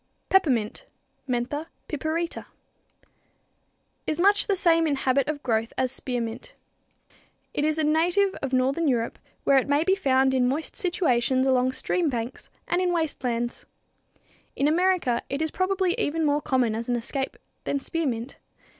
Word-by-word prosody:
=Peppermint= 280 - +2 0.4
(Mentha 255 +6 -2 0.2
piperita, 315 +3 -2
Linn.) - - -7 1.6
is 310 - -1
much 405 +3 +4
the 400 - +2
same 330 -3 +3
in 290 - +1
habit 265 0 +1
of 295 -1 -3
growth 225 -2 0
as 260 -1 +1
spearmint. 250 - -4 1.0
It 290 - -1
is 310 +1 +1
a 315 - +1
native 345 +6 +2
of 275 - -3
northern 270 +5 +1
Europe, 235 -4 0 0.2
where 275 -1 +5
it 265 - -4
may 285 +2 +3
be 380 - +3
found 265 -7 +2
in 250 -1 +3
moist 300 +5 -3
situations 260 - +1
along 255 -1 +2
stream 340 +4 0
banks 240 -1 -5 0.2
and 350 +1 +1
in 360 -1 +1
waste 320 -5 -1
lands. 240 -1 -2 0.9
In 280 - +2
America 340 -7 +2
it 275 - -2
is 315 -1 -1
probably 375 -1 +1
even 320 +2 0
more 295 0 +2
common 255 -6 +1
as 230 +2 -4
an 245 - +2
escape 265 +3 -3 0.3
than 280 - 0
spearmint. 270 -6 -3
285 Hz, 155 wpm, -26 LUFS, 255-335 Hz, 1.6 s, where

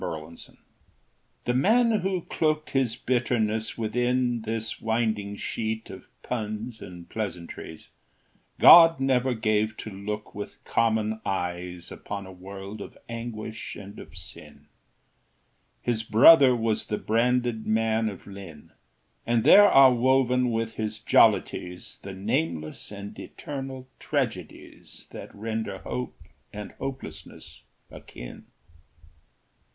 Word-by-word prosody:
Thomas 80 +1 -7
Hood - - -23 0.9
The 120 - 0
man 230 - +4
who 190 -1 -1
cloaked 155 -1 -1
his 130 -4 +1
bitterness 115 -3 -1
within 120 +1 0
This 110 0 -4
winding 110 -3 -1
sheet 110 +2 -4
of 95 - -11 0.2
puns 110 0 -4
and 90 -2 -10
pleasantries, 85 -6 -6 0.7
God 165 -3 +9
never 130 -1 +1
gave 110 0 0
to 110 - -7
look 105 +2 -6
with 105 0 -8
common 110 -1 0
eyes 90 -1 -4
Upon 100 -1 -6
a 95 - -10
world 95 +3 -9
of - - -10
anguish 115 -2 -6
and 100 0 -10
of 85 +2 -12
sin: 90 - -12 1.2
His 120 -2 0
brother 130 +4 +7
was 115 -2 -1
the 105 - -1
branded 120 +1 0
man 110 0 +1
of 100 - -10
Lynn; 95 -7 -11 0.6
And 115 -1 +2
there 205 0 +8
are 135 -2 +8
woven 125 0 +2
with 115 -1 -2
his 110 0 -3
jollities 90 -4 +2
The 100 - -7
nameless 80 -6 -2
and 100 +1 -8
eternal 135 -2 -7
tragedies 115 - -4
That - - -8
render 110 +1 -4
hope 65 0 -5 0.3
and 105 0 -7
hopelessness 135 -1 -8 0.3
akin. - - -11
110 Hz, 115 wpm, -26 LUFS, 100-125 Hz, 1.2 s, God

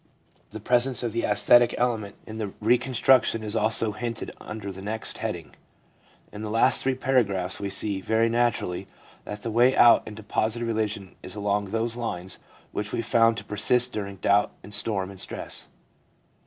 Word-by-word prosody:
The 110 - -8
presence 125 +4 +1
of 120 - -1
the 115 - -1
aesthetic 120 +3 +5
element 110 -5 -1
in 110 -2 -6
reconstruction 120 0 +3
is 105 +1 -4
also 110 0 +2
hinted 115 +2 -5
under 105 -2 -6
the 95 0 -9
next 110 +3 -4
heading. - - -5 0.8
In 105 - -8
the 110 - -4
last 115 +4 +4
three 130 0 +1
paragraphs 100 -9 0
we 100 - -3
see, 100 -1 -2
very 110 +3 +2
naturally, 115 -6 -1 0.4
that 105 0 -7
the 115 - -3
way 120 +4 +4
out 120 - +7
into 110 0 -9
positive 110 +3 -1
religion 105 -4 -2
is 95 - -9
along 100 0 -1
those 115 +3 -2
lines 95 -6 -4 0.3
which 105 0 -4
we 115 - -2
found 115 0 +3
to - - -5
persist 125 +4 +2
during 100 -2 -4
doubt 100 +2 +2
and 105 - -10
storm 100 -2 +1
and 95 - -12
stress. - - -3
110 Hz, 170 wpm, -25 LUFS, 100-120 Hz, 0.8 s, out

